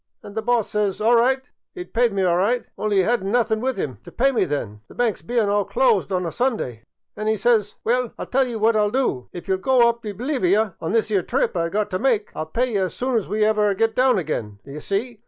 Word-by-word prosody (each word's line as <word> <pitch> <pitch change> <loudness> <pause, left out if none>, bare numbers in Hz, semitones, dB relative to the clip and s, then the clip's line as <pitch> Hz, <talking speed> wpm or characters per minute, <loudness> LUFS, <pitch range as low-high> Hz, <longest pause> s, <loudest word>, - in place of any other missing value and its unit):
* - - -52
An' 205 - -10
the 220 - -2
boss 240 -2 0
says. 205 -2 0
All 225 +3 +4
right, 260 +3 +3 0.3
'e 360 - -5
'd - - -26
pye 240 +1 +4
me 200 -4 -1
all 175 -2 +3
right, 225 +7 +1
only 205 -2 +1
'e - - 0
*ad 235 +3 +1
n't 195 - -3
nothin' 225 -2 +1
with 260 -2 -1
'im 135 - -3
t' - - -11
pye 270 +3 +2
me 245 - +1
then, 105 -8 -4
the - - -16
banks 235 -4 0
bein* 235 -3 0
all 205 0 +2
closed 485 - +1
on 180 -1 0
a 165 - -3
Sunday; 215 - -2 0.3
an* 215 - -4
'e 220 0 +2
says, 215 -1 +2
* - - -53
Well, 245 0 0
I - - -4
'11 - - -12
tell 265 0 +3
ye 240 - -5
what 225 +1 +2
I - - +3
'11 210 0 +1
do. 250 - -1
If 175 - -9
you 190 - +1
'11 190 - -2
go 250 0 +4
up 235 0 -3
t' 215 -3 -5
Bolivy 235 - 0 0.3
on 165 - -2
this 225 -1 +1
'ere 200 -3 +2
trip - - -1
I 170 -1 0
've - - -17
got 210 0 -1
t' 185 - -1
make, 225 -5 +1
I - - -6
'11 155 0 -5
pye 240 - +1 0.2
ye 185 - -1
soon 250 +8 -2
as 215 -3 -1
ever 215 0 +2
we 200 - 0
get 225 +3 +1
down 255 -2 +3
again,' 120 - -3
d' - - -14
ye 150 - -6
see. 210 - -3
215 Hz, 295 wpm, -22 LUFS, 190-245 Hz, 0.3 s, All